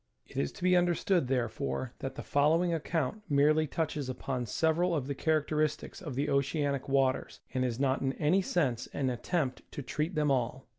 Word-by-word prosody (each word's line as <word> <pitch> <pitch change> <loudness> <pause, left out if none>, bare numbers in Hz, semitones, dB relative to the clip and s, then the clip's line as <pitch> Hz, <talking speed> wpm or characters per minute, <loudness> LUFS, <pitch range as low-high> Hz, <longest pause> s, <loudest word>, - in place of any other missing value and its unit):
It - - -17
is 70 - 0
to - - -10
be 185 0 +5
understood, 175 -2 +2
therefore, 125 0 -2
that 135 - -5
the - - -6
following 165 +5 +3
account 165 +4 -1
merely 150 +2 +4
touches 150 -3 -2
upon 125 -1 -3
several 165 +7 +2
of 140 -5 -1
the 140 - -2
characteristics 155 0 0
of 150 -8 -6
the 140 +3 0
oceanic 140 0 0
waters, 135 -1 +1
and 130 -1 +1
is 125 -1 -1
not 135 -1 +1
in 135 0 0
any 165 +7 +2
sense 135 -10 0
an 130 -2 0
attempt 130 +2 -1
to 145 - -5
treat 155 +7 -2
them 150 -2 +2
all. 130 0 -1
145 Hz, 185 wpm, -31 LUFS, 130-160 Hz, -, be